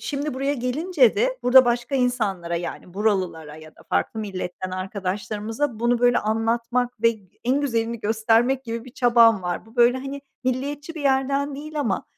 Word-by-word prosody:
şimdi 290 Hz, -1 st, -3 dB
buraya 275 Hz, +2 st, -1 dB
gelince 270 Hz, +2 st, +2 dB
de -, -, +1 dB
burada 255 Hz, +1 st, +7 dB
başka 240 Hz, +3 st, -1 dB
insanlara, 210 Hz, -10 st, 0 dB
yani, 175 Hz, +1 st, -6 dB
buralılara 185 Hz, -7 st, -1 dB
ya 155 Hz, 0 st, -12 dB
da -, -, -18 dB
farklı 220 Hz, -, -1 dB
milletten 185 Hz, -2 st, -5 dB
arkadaşlarımıza 210 Hz, +6 st, -3 dB
bunu, 240 Hz, 0 st, +2 dB
böyle, 245 Hz, 0 st, +4 dB
anlatmak 230 Hz, +2 st, -1 dB
ve 230 Hz, -, +6 dB
g 205 Hz, -5 st, -13 dB
en 260 Hz, +4 st, +2 dB
güzelini 230 Hz, -4 st, -1 dB
göstermek 225 Hz, +5 st, +2 dB
gibi 230 Hz, 0 st, -5 dB
bir 255 Hz, -, -11 dB
çabam 230 Hz, -5 st, +4 dB
var. 175 Hz, +4 st, -3 dB
Bu, 225 Hz, +2 st, -19 dB
böyle, 240 Hz, +1 st, +5 dB
hani, 275 Hz, +1 st, -6 dB, 0.2 s
milliyetçi 285 Hz, +5 st, -3 dB
bir 315 Hz, -, -6 dB
yerden 275 Hz, +1 st, +1 dB
değil 300 Hz, +2 st, -5 dB
ama, 215 Hz, -9 st, -1 dB
235 Hz, 170 wpm, -23 LUFS, 210-270 Hz, 0.2 s, burada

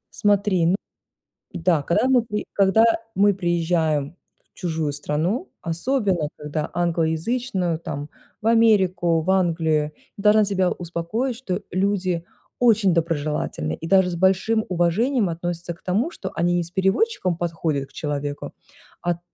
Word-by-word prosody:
Смотри, 200 Hz, -4 st, +2 dB
ну 180 Hz, -, +3 dB, 0.8 s
да, 170 Hz, -4 st, +1 dB
когда 170 Hz, -, +1 dB
мы 255 Hz, -3 st, +4 dB
ты 210 Hz, 0 st, -2 dB
когда 200 Hz, +3 st, +4 dB, 0.3 s
мы 200 Hz, 0 st, +4 dB
приезжаем 165 Hz, -4 st, 0 dB, 0.4 s
в -, -, -63 dB
чужую 160 Hz, -4 st, -2 dB
страну, 155 Hz, -, -2 dB
особенно 180 Hz, -, 0 dB
когда 150 Hz, +1 st, -4 dB
англоязычную, 175 Hz, +3 st, 0 dB
там 145 Hz, -2 st, -6 dB, 0.3 s
в 220 Hz, -, +1 dB
Америку, 190 Hz, -7 st, +3 dB
в 170 Hz, +4 st, -1 dB
Англию, 160 Hz, -5 st, +1 dB, 0.2 s
я 200 Hz, -, -8 dB
должна 215 Hz, 0 st, +5 dB
тебя 190 Hz, -2 st, +1 dB
успокоить, 180 Hz, +9 st, -3 dB
что 205 Hz, -6 st, -4 dB
люди 185 Hz, -3 st, 0 dB, 0.3 s
очень 220 Hz, -6 st, +4 dB
доброжелательные, 155 Hz, -, -1 dB
и 165 Hz, -, -6 dB
даже 190 Hz, 0 st, +4 dB
с 170 Hz, -, -4 dB
большим 190 Hz, +5 st, +2 dB
уважением 190 Hz, +7 st, +1 dB
относятся 170 Hz, +1 st, -4 dB
к 170 Hz, -, -17 dB
тому, 215 Hz, -, 0 dB
что -, -, -7 dB
они 175 Hz, +1 st, +1 dB
не 175 Hz, -, 0 dB
с 170 Hz, -, -13 dB
переводчиком 190 Hz, -, +1 dB
подходят 160 Hz, -5 st, -2 dB
к -, -, -25 dB
человеку, 145 Hz, -1 st, -4 dB, 0.5 s
а 175 Hz, -1 st, -1 dB
175 Hz, 140 wpm, -23 LUFS, 165-200 Hz, 0.8 s, должна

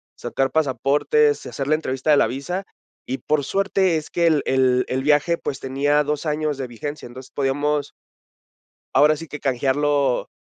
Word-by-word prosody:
sacar 135 Hz, 0 st, -1 dB
pasaportes, 160 Hz, -, +2 dB
hacer 135 Hz, -, -5 dB
la 155 Hz, -, +3 dB
entrevista 135 Hz, -1 st, -3 dB
de -, -, +7 dB
la -, -, +4 dB
visa, 175 Hz, +9 st, -4 dB, 0.4 s
y, 130 Hz, -, -2 dB
por 150 Hz, -2 st, 0 dB
suerte, 195 Hz, -1 st, +1 dB
es 155 Hz, -, -6 dB
que 170 Hz, -1 st, +2 dB
el 155 Hz, -3 st, +2 dB
el 130 Hz, -1 st, +2 dB
el 130 Hz, +1 st, -2 dB
viaje, 150 Hz, +3 st, +3 dB
pues, 135 Hz, -, -5 dB
tenía 145 Hz, +3 st, +1 dB
2 150 Hz, +1 st, -3 dB
años 150 Hz, -1 st, -1 dB
de 135 Hz, -2 st, -4 dB
vigencia. 145 Hz, +5 st, -7 dB
Entonces, 125 Hz, +2 st, -12 dB
podíamos 145 Hz, +1 st, -1 dB, 1.0 s
ahora 150 Hz, +1 st, +5 dB
sí 165 Hz, -, -8 dB
que 150 Hz, -, -8 dB
canjearlo, 140 Hz, 0 st, +1 dB
145 Hz, 165 wpm, -22 LUFS, 135-155 Hz, 1.0 s, de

